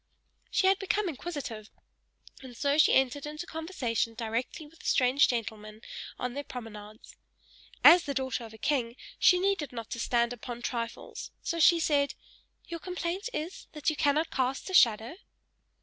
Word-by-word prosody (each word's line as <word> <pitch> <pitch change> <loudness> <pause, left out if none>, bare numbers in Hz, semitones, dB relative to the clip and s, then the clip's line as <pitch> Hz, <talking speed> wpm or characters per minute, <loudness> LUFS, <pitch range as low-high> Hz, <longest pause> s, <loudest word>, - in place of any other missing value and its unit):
She - - +1
had 385 +1 +4
become 390 +1 0
inquisitive; 280 -9 -5 0.7
and 255 -3 -11
so 285 +3 +1
she - - +6
entered 270 +2 +2
into 305 +3 -6
conversation 300 -10 -2
directly 235 +6 -3
with 320 +2 -18
the - - -8
strange 260 +2 +4
gentleman, 220 -2 -4 0.4
on 250 -1 -3
their 285 +2 -4
promenades. 215 -4 -10 0.7
As 345 0 +9
the 280 -2 -3
daughter 260 -2 -2
of 225 - -9
a 220 - -12
king, 240 -2 0 0.2
she 360 - +6
needed 380 -6 0
not 230 -3 -7
to 235 - -4
stand 235 +1 +1
upon 240 0 -8
trifles, 235 -2 -4
so 335 - -2
she 335 +1 +6
said, 285 -3 +1 0.5
"Your 335 -1 -6
complaint 360 +4 -3
is, 340 -4 -5
that 305 +1 0
you - - -5
cannot 300 +3 +1
cast 265 +7 -1
a - - -7
shadow?" 230 0 +4
275 Hz, 165 wpm, -29 LUFS, 235-330 Hz, 0.7 s, As